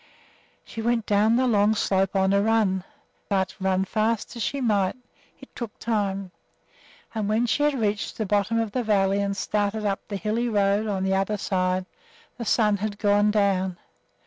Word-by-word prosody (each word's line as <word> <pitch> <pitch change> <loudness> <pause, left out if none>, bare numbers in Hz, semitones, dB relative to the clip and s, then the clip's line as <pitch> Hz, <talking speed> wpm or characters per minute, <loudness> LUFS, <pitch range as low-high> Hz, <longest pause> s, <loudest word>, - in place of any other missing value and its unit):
She 225 - -7
went 230 -1 0
down 210 +2 +3
the 255 +2 +2
long 215 -2 +3
slope 195 -1 +1
on 190 0 +3
a 200 - +3
run; 210 -4 +1 0.5
but, 190 -2 0
run 190 0 +1
as - - -8
fast 220 +2 -1
as 235 - -6
she 250 +8 -1
might, 205 -7 +1 0.4
it - - -15
took 235 -4 -6
time, 200 -4 -2 0.8
and 215 -2 -2
when 220 +3 +2
she 245 - 0
had 295 -1 +2
reached 205 -1 -1
the 220 - -1
bottom 205 +3 +1
of 225 -2 -1
the 250 - -1
valley 200 -3 +2
and 200 0 -2
started 210 +1 -1
up 195 -1 0
the 205 - -4
hilly 220 +4 -1
road 205 0 +1
on 195 -2 -1
the 190 0 +1
other 195 +2 0
side, 185 -1 0 0.5
the 235 - -4
sun 210 -1 +2
had 205 0 -4
gone 205 0 +3
down. 195 -3 +1
205 Hz, 185 wpm, -25 LUFS, 195-220 Hz, 0.8 s, down